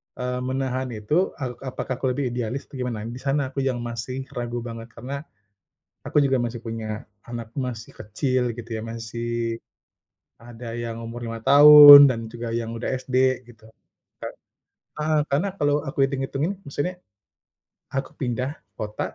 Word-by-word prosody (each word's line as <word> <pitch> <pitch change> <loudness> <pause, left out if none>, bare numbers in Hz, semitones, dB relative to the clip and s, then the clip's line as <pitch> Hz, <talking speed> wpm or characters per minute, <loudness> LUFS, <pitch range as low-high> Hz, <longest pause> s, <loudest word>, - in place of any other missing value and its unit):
eee, 125 0 -3
menahan 130 0 -2
itu, 105 +7 -2 0.3
a - - -1 0.3
apakah 130 - -3
aku - - -3
lebih 140 +2 -2
idealis 125 +2 -3
atau - - -12
gimana. 120 -4 -3
Di 120 - -7
sana 140 +1 +1
aku 140 - -4
yang 125 -2 -1
masih 120 +2 -5 0.2
ragu 120 0 -3
banget 115 0 -8
karena 125 +4 -6 0.9
aku - - -6
juga 135 -1 +2
masih 120 0 -4
punya 110 -1 -5 0.2
anak 120 -1 -6
masih 125 -4 -5
kecil 125 +5 -1
gitu 120 0 -9
ya, 110 - -5
masih 115 +1 -6 1.1
ada 120 0 -9
yang 115 -1 -5
umur 120 +1 -7
5 115 0 -5
tahun 145 0 +11
dan 120 -3 -1
juga 120 -1 -5
yang 115 0 -3
udah 115 - -3
SD 130 0 -6 0.3
gitu, 110 -2 -17 0.5
Kak. - - -6 0.7
Heeh, 155 0 +1
karena 145 +8 +1
kalau 145 -3 +2
aku 135 0 +1
hitung-hitungin 140 +7 -2
maksudnya 145 +6 -3 1.0
aku 135 0 -2
pindah 125 0 -2 0.3
kota, 105 0 -5
125 Hz, 155 wpm, -24 LUFS, 115-135 Hz, 1.1 s, tahun